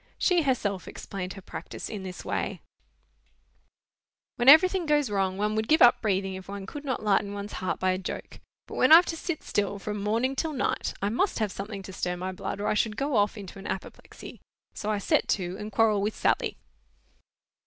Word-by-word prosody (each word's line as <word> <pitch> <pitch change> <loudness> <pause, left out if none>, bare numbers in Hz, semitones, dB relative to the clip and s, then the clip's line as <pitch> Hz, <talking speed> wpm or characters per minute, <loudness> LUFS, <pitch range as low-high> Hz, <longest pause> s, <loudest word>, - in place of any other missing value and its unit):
She 360 -2 +3
herself 215 - -1
explained 185 -2 -6
her 195 - -11
practice - - -7
in 210 -3 -6
this 185 -1 -8
way:— - - -2 1.8
"When 240 +2 +5
everything 360 +3 +7
goes 295 -6 +2
wrong, 190 -2 0
one 210 +1 0
would 220 0 -1
give 315 +2 +5
up 240 - +6
breathing 195 -3 0
if 190 -1 -8
one 200 0 -6
could 290 +9 -8
not 260 -6 -3
lighten 200 -1 +1
ones 200 +1 -6
heart 185 - -2
by 185 0 +2
a 185 - -1
joke. 190 - -7 0.3
But - - -9
when 255 - +4
I've 335 +3 +10
to 330 - -3
sit 325 -1 -4
still 205 -1 -1
from 210 +1 -4
morning 230 +6 0
till 315 +3 -2
night, 265 - -1
I 200 - +2
must 255 - 0
have 215 -4 0
something 195 +1 -6
to 190 - -9
stir 180 -1 -2
my 185 +1 -3
blood, 185 +1 -5
or 205 - -3
I - - +2
should 215 0 0
go 280 -1 -1
off 205 +1 +2
into 195 -1 -9
an 195 - -8
apoplexy; 190 - -8 0.3
so 210 - -4
I 210 - +1
set 200 - +1
to, 180 -1 -4
and 210 0 -6
quarrel 215 -1 +3
with 210 +2 -1
Sally." - - 0
210 Hz, 205 wpm, -27 LUFS, 195-255 Hz, 1.8 s, I've